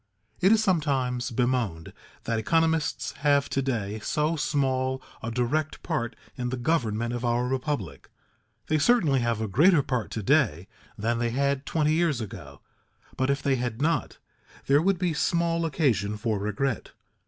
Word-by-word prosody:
It 190 Hz, +3 st, +4 dB
is 220 Hz, -1 st, +4 dB
sometimes 135 Hz, -, 0 dB
bemoaned 120 Hz, -9 st, -1 dB, 0.3 s
that 115 Hz, -1 st, -1 dB
economists 160 Hz, +3 st, +1 dB
have 145 Hz, -1 st, +2 dB
to 135 Hz, -, 0 dB
day 110 Hz, -6 st, -2 dB
so 150 Hz, +8 st, 0 dB
small 130 Hz, -3 st, 0 dB, 0.2 s
a 115 Hz, -, -4 dB
direct 125 Hz, +7 st, -1 dB
part 120 Hz, 0 st, -2 dB, 0.2 s
in 125 Hz, -2 st, -3 dB
the 130 Hz, -, -3 dB
government 120 Hz, -5 st, 0 dB
of 120 Hz, 0 st, -4 dB
our 120 Hz, 0 st, +1 dB
republic. 130 Hz, -, -3 dB, 0.6 s
They 155 Hz, 0 st, +1 dB
certainly 160 Hz, -, +3 dB
have 115 Hz, -2 st, 0 dB
a 110 Hz, -, -1 dB
greater 150 Hz, -, +4 dB
part 125 Hz, -4 st, -2 dB
to 110 Hz, -, -3 dB
day 85 Hz, -1 st, +2 dB, 0.3 s
than 115 Hz, +2 st, -1 dB
they 120 Hz, 0 st, 0 dB
had 140 Hz, +2 st, 0 dB
twenty 155 Hz, -1 st, +1 dB
years 160 Hz, -5 st, +1 dB
ago, 90 Hz, -, -8 dB, 0.5 s
but 130 Hz, +1 st, 0 dB
if 140 Hz, +1 st, 0 dB
they 135 Hz, -2 st, +2 dB
had 120 Hz, -2 st, -3 dB
not, 165 Hz, +3 st, 0 dB, 0.5 s
there 140 Hz, +2 st, +4 dB
would 195 Hz, +2 st, +2 dB
be 175 Hz, -2 st, 0 dB
small 170 Hz, +1 st, +1 dB
occasion 110 Hz, -, 0 dB
for 110 Hz, -1 st, -1 dB
regret. 105 Hz, +4 st, -2 dB
130 Hz, 160 wpm, -26 LUFS, 115-155 Hz, 0.6 s, It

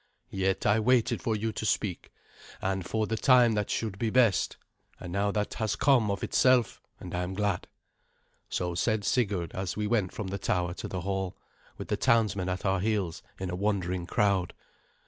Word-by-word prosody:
Yet 95 Hz, 0 st, 0 dB
I 105 Hz, +2 st, +4 dB
waited 120 Hz, +1 st, +2 dB
for 110 Hz, -, 0 dB
you 110 Hz, +1 st, -1 dB
to 110 Hz, -, -5 dB
speak, 100 Hz, -3 st, -1 dB, 0.5 s
and 95 Hz, 0 st, -1 dB
for 110 Hz, +4 st, -1 dB
the 110 Hz, -, -2 dB
time 125 Hz, -1 st, +5 dB
that 105 Hz, -2 st, -1 dB
should 105 Hz, -4 st, -2 dB
be 115 Hz, -, 0 dB
best; 115 Hz, -5 st, +3 dB, 0.4 s
and 90 Hz, -, -7 dB
now 100 Hz, +1 st, +1 dB
that 105 Hz, 0 st, -2 dB
has 110 Hz, -3 st, -1 dB
come 130 Hz, -7 st, +3 dB
of 100 Hz, -1 st, -2 dB
itself, 125 Hz, -4 st, +3 dB, 0.2 s
and 90 Hz, -, -8 dB
I 90 Hz, -, -1 dB
am 90 Hz, +1 st, -4 dB
glad." 100 Hz, -2 st, -1 dB, 0.8 s
So 90 Hz, -1 st, -2 dB
said 110 Hz, +4 st, 0 dB
Sigurd, 100 Hz, -10 st, 0 dB
as 95 Hz, +1 st, -3 dB
we 105 Hz, -, -1 dB
went 105 Hz, -4 st, +1 dB
from 105 Hz, -4 st, -5 dB
the 100 Hz, +1 st, -4 dB
tower 90 Hz, -2 st, 0 dB
to -, -, -6 dB
the 90 Hz, -, -4 dB
hall, 95 Hz, 0 st, -3 dB, 0.4 s
with -, -, -7 dB
the -, -, 0 dB
townsmen 105 Hz, -5 st, +2 dB
at 90 Hz, +2 st, -3 dB
our 95 Hz, -1 st, +2 dB
heels 100 Hz, -5 st, -1 dB, 0.2 s
in 95 Hz, -1 st, -3 dB
a -, -, -2 dB
wondering 90 Hz, -3 st, -1 dB
crowd. 95 Hz, -3 st, +1 dB
100 Hz, 190 wpm, -29 LUFS, 95-110 Hz, 0.8 s, time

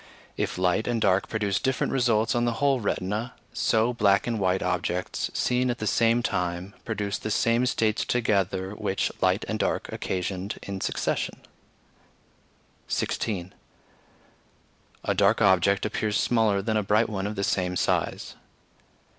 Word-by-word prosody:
If -, -, -2 dB
light 90 Hz, +3 st, +1 dB
and 120 Hz, -1 st, 0 dB
dark 100 Hz, -2 st, +2 dB
produce 105 Hz, -3 st, 0 dB
different 130 Hz, -1 st, 0 dB
results 115 Hz, -4 st, +2 dB
on 120 Hz, 0 st, +1 dB
the 120 Hz, -, +1 dB
whole 140 Hz, +1 st, +2 dB
retina, 105 Hz, +3 st, -2 dB, 0.2 s
so 115 Hz, +2 st, +2 dB
black 100 Hz, -4 st, +3 dB
and 115 Hz, -2 st, -1 dB
white 95 Hz, -1 st, +1 dB
objects 90 Hz, +1 st, -1 dB
seen 125 Hz, 0 st, +1 dB
at 120 Hz, -, -1 dB
the 110 Hz, -, -4 dB
same 115 Hz, +3 st, +3 dB
time 90 Hz, -1 st, -2 dB
produce 105 Hz, -3 st, -2 dB
the -, -, -4 dB
same 115 Hz, +3 st, +2 dB
states 110 Hz, -3 st, +1 dB
together 100 Hz, -5 st, 0 dB
which 105 Hz, -2 st, -1 dB
light -, -, +2 dB
and -, -, -2 dB
dark -, -, -1 dB
occasioned 95 Hz, +2 st, -3 dB
in 100 Hz, -1 st, -5 dB
succession. -, -, -2 dB, 1.5 s
16. 95 Hz, -4 st, -2 dB, 1.5 s
A -, -, +1 dB
dark -, -, +3 dB
object 95 Hz, +2 st, +3 dB
appears 105 Hz, 0 st, -1 dB
smaller 110 Hz, -4 st, +2 dB
than 110 Hz, +1 st, 0 dB
a -, -, +2 dB
bright 105 Hz, +3 st, +2 dB
one 100 Hz, -2 st, -3 dB
of 105 Hz, -, -4 dB
the 100 Hz, -, -2 dB
same 90 Hz, -2 st, 0 dB
size. -, -, -1 dB
105 Hz, 145 wpm, -26 LUFS, 95-115 Hz, 1.5 s, black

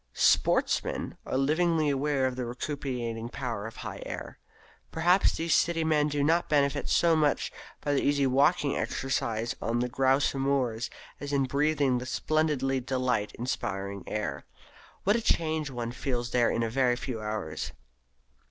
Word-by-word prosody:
Sportsmen -, -, +2 dB
are -, -, -1 dB
livingly 155 Hz, +2 st, +2 dB
aware 140 Hz, -1 st, +1 dB
of 130 Hz, -1 st, -1 dB
the 125 Hz, -, -3 dB
recuperative 120 Hz, -2 st, -4 dB
power 115 Hz, -6 st, -4 dB
of 115 Hz, -, -10 dB
the -, -, -12 dB
Highland -, -, -6 dB
air. -, -, -7 dB, 0.5 s
Perhaps 175 Hz, +4 st, +3 dB
these 165 Hz, -1 st, 0 dB
city 165 Hz, -1 st, +2 dB
men 150 Hz, -2 st, +2 dB
do 145 Hz, -1 st, 0 dB
not 165 Hz, +4 st, +2 dB
benefit 145 Hz, -1 st, +1 dB
so 170 Hz, -1 st, +4 dB
much 150 Hz, -2 st, +1 dB, 0.3 s
by 145 Hz, -, 0 dB
the 140 Hz, -, +2 dB
easy 140 Hz, -1 st, +2 dB
walking 140 Hz, +3 st, +3 dB
exercise 115 Hz, -4 st, -1 dB
on 115 Hz, +1 st, 0 dB
the 125 Hz, +1 st, +1 dB
grouse 135 Hz, +2 st, +2 dB
moors 135 Hz, -4 st, 0 dB, 0.3 s
as 145 Hz, 0 st, -5 dB
in 140 Hz, -1 st, +2 dB
breathing 140 Hz, -1 st, +1 dB
the 125 Hz, -, -6 dB
splendidly 145 Hz, -3 st, 0 dB
delight 125 Hz, -4 st, -1 dB
inspiring 100 Hz, -5 st, -3 dB
air. 105 Hz, -10 st, -3 dB, 0.6 s
What 205 Hz, +2 st, +3 dB
a 235 Hz, -, +1 dB
change 160 Hz, -7 st, 0 dB
one 120 Hz, -3 st, -4 dB
feels 120 Hz, -1 st, -3 dB
there 120 Hz, -1 st, +3 dB
in 115 Hz, -, 0 dB
a 115 Hz, -, 0 dB
very 125 Hz, -1 st, +2 dB
few 120 Hz, -3 st, -5 dB
hours! 105 Hz, -9 st, -4 dB
135 Hz, 160 wpm, -28 LUFS, 120-150 Hz, 0.6 s, so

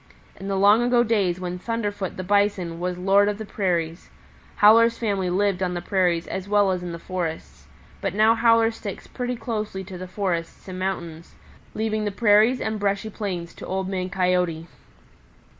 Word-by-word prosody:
In 195 Hz, -, -8 dB
the 195 Hz, -1 st, -1 dB
long 205 Hz, +4 st, +5 dB
ago 240 Hz, 0 st, +3 dB
days 200 Hz, -6 st, +1 dB
when 180 Hz, 0 st, -4 dB
Thunderfoot 205 Hz, -3 st, -3 dB
the 185 Hz, -, -4 dB
Bison 195 Hz, -4 st, +1 dB
was 180 Hz, 0 st, -2 dB
lord 195 Hz, +3 st, +3 dB
of 205 Hz, -, -3 dB
the 220 Hz, -, -6 dB
prairies, 175 Hz, -5 st, -2 dB, 0.5 s
Howler's 230 Hz, +2 st, +6 dB
family 200 Hz, -5 st, -1 dB
lived 195 Hz, +1 st, +1 dB
on 180 Hz, -1 st, -1 dB
the -, -, -2 dB
prairies 175 Hz, -3 st, +1 dB
as 190 Hz, +1 st, -5 dB
well 205 Hz, -2 st, +3 dB
as 180 Hz, -1 st, -2 dB
in 175 Hz, -1 st, -5 dB
the 170 Hz, -, -5 dB
forests, 160 Hz, -, -5 dB, 0.3 s
but -, -, -2 dB
now 215 Hz, +2 st, +5 dB
Howler 230 Hz, 0 st, +4 dB
sticks 210 Hz, -3 st, -7 dB
pretty 250 Hz, -1 st, -4 dB
closely 215 Hz, -4 st, -4 dB
to 185 Hz, -1 st, -9 dB
the 185 Hz, -, -6 dB
forests 180 Hz, -3 st, -3 dB
and 185 Hz, -1 st, -6 dB
mountains, 170 Hz, -4 st, -5 dB, 0.4 s
leaving 215 Hz, -1 st, -1 dB
the 205 Hz, -, -1 dB
prairies 220 Hz, +4 st, +4 dB
and 220 Hz, -1 st, -2 dB
brushy 200 Hz, +1 st, -1 dB
plains 180 Hz, -6 st, -5 dB
to -, -, -10 dB
Old 190 Hz, 0 st, -2 dB
Man 185 Hz, -1 st, -3 dB
Coyote." 180 Hz, -3 st, 0 dB
195 Hz, 180 wpm, -24 LUFS, 180-215 Hz, 0.5 s, Howler's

